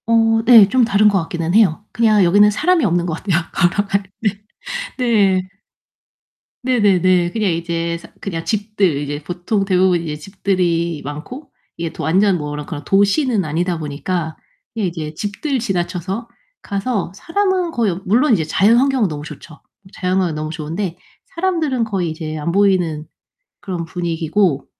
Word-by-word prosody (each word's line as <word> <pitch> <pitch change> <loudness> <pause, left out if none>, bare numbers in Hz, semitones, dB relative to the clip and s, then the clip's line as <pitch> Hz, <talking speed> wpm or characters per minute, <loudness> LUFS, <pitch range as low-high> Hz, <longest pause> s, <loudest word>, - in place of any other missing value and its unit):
어 225 -1 +3
네. 230 -4 +8
좀 250 +5 +3
다른 215 -2 +4
것 200 -2 +2
같기는 165 +1 -3
해요. 210 -3 +3
그냥 215 -2 +3
여기는 205 +4 +5
사람이 345 - +2
없는 175 -2 +1
것 170 - -2
같아요, 185 -4 +1 0.2
걸어갈 200 +2 +1 0.2
때. 205 -1 -1 0.6
네. 200 -7 +2 1.2
네네네. 185 -8 +3
그냥 210 -3 0
이제 170 0 -2
사 170 - -14
그냥 165 -4 -4
집들 205 -7 0
이제 145 +1 -4
보통 180 +5 -2
대부분 185 -2 +3
이제 155 -3 -4
집들이 170 -2 -1
많고 155 - -8 0.3
이게 165 -1 -3
도 160 - -7
완전 190 +5 +3
뭐 150 -2 -5
그런 150 0 -6
그런 145 -4 -6
도시는 205 - +2
아니다 170 +3 -1
보니까 160 +2 -3 0.4
그냥 215 -4 -1
이제 155 -3 -6
집들 210 - -3
지나쳐서 195 +1 -3 0.3
가서 200 -2 -2
사람은 365 - 0
거의 210 - 0
물론 235 +7 +3
이제 170 - +2
자연환경은 235 - +3
너무 150 -1 -6
좋죠. 155 +1 -11 0.4
자연환경은 180 -3 0
너무 155 0 -4
좋은데 165 +3 -4 0.4
사람들은 330 -8 0
거의 190 -6 -2
이제 155 -1 -5
안 155 +3 -2
보이는 180 -5 +1 0.5
그런 180 -4 -4
분위기고 165 -1 -1
185 Hz, 320 characters per minute, -18 LUFS, 165-215 Hz, 1.2 s, 네